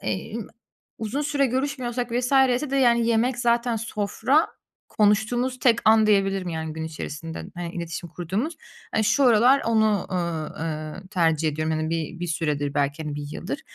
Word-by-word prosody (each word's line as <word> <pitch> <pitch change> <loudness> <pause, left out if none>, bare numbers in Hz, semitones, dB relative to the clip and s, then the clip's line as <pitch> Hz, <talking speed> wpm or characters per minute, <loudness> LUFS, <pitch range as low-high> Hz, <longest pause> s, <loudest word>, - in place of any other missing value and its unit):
emm, 145 - -4 0.5
uzun 230 +7 -2
süre 285 -1 +1
görüşmüyorsak 250 -2 -2
vs. 245 +2 0 0.2
ise 275 +1 -4
de 275 - 0
yani 235 -3 +4
yemek 235 +2 +1
zaten 235 -1 +1
sofra 225 +7 +1 0.4
konuştuğumuz 220 +5 +1
tek 235 -3 +4
an 220 0 +6
diyebilirim. 195 -3 +2
Yani, 160 -1 -4
gün 160 0 -5
içerisinde 160 0 -6
hani 175 -1 -5
iletişim 170 0 -5
kurduğumuz. 200 - -3 0.4
Hani, 220 - +2
şu 275 +6 +3
aralar 245 +4 +5
onu, 220 -3 +2
ııı, 170 -3 -2
ııı, 160 +3 -5
tercih 165 -4 +2
ediyorum. 155 +1 -2
Yani, 155 0 -1
bir 165 +1 -3
bir 175 - -2
süredir 150 -4 -1
belki, 145 +2 0
hani 150 -2 -4
1 145 0 -5
yıldır. - - -5
205 Hz, 160 wpm, -24 LUFS, 160-240 Hz, 0.5 s, an